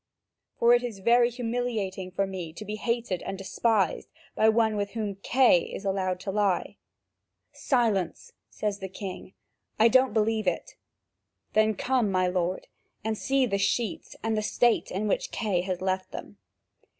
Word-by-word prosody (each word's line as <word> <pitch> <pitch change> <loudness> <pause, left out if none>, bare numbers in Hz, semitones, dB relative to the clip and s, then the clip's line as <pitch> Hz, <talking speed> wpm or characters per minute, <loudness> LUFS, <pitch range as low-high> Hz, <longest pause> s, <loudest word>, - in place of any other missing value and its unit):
For 235 +1 +5
it 240 - +4
is 235 -4 -4
very 235 +4 +4
humiliating 230 -6 -3
for 190 +2 0
me 180 -4 -6
to 215 - -8
be 210 +1 -4
hated 230 -5 -1
and 195 - -5
despised 195 -1 0 0.2
by 220 - +4
one 220 -1 +2
with 200 -1 -2
whom 210 -4 -3
Kay 250 -7 +5
is 200 - -7
allowed 190 -2 -1
to 195 - -3
lie." 200 -2 0 0.8
"Silence!" 220 - 0 0.2
says 205 -2 -3
the 190 -1 -6
king; 185 -1 -8 0.4
"I 225 +2 +6
don't 260 +2 +4
believe 215 -1 +1
it." 175 - -2 0.8
"Then 215 0 +3
come, 245 -1 +1
my 185 -1 +2
lord, 180 0 -1 0.4
and 220 0 -1
see 270 +4 +1
the 200 -4 -1
sheets 225 +2 -1
and 225 0 0
the 215 - 0
state 235 +2 +2
in 205 +3 -2
which - - 0
Kay 205 -6 0
has 185 -1 -3
left 185 0 -1
them. - - -9
210 Hz, 160 wpm, -27 LUFS, 190-230 Hz, 0.8 s, I